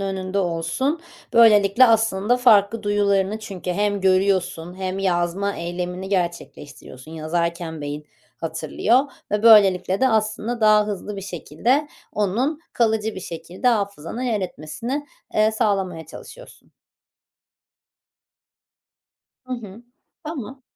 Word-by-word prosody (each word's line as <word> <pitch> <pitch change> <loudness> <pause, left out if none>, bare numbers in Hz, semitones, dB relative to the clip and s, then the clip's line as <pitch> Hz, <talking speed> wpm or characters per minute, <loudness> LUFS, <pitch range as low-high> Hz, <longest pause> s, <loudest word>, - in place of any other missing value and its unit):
önünde 190 0 -3
olsun. 180 - -1 0.3
Böylelikle 215 0 +6
aslında 225 0 +2
farklı 220 -3 +4
duyularını 205 0 +1
çünkü 195 -4 -6
hem 205 +1 0
görüyorsun 185 -2 +1
hem 190 0 -4
yazma 190 +1 0
eylemini 180 +2 -4
gerçekleştiriyorsun. 155 -5 -5
Yazarken 165 0 -3
beyin 145 +1 -6 0.3
hatırlıyor 165 - +1 0.3
ve 210 +1 0
böylelikle 195 -4 +5
de 260 - +4
aslında 220 +1 -1
daha 215 -1 +5
hızlı 205 0 -5
bir - - -5
şekilde 205 - -1 0.2
onun 240 - -1
kalıcı 220 -2 0
bir 190 - -7
şekilde 175 +7 -3
hafızana 200 -1 -2
yer 225 -5 0
etmesini, 230 - -5 0.3
eee, 215 0 +4
sağlamaya 195 - -1
çalışıyorsun. - - -13 2.7
Hı 255 - -7
hı. 220 -1 -10 0.4
Tamam. 270 -4 -7
200 Hz, 105 wpm, -22 LUFS, 175-220 Hz, 2.7 s, Böylelikle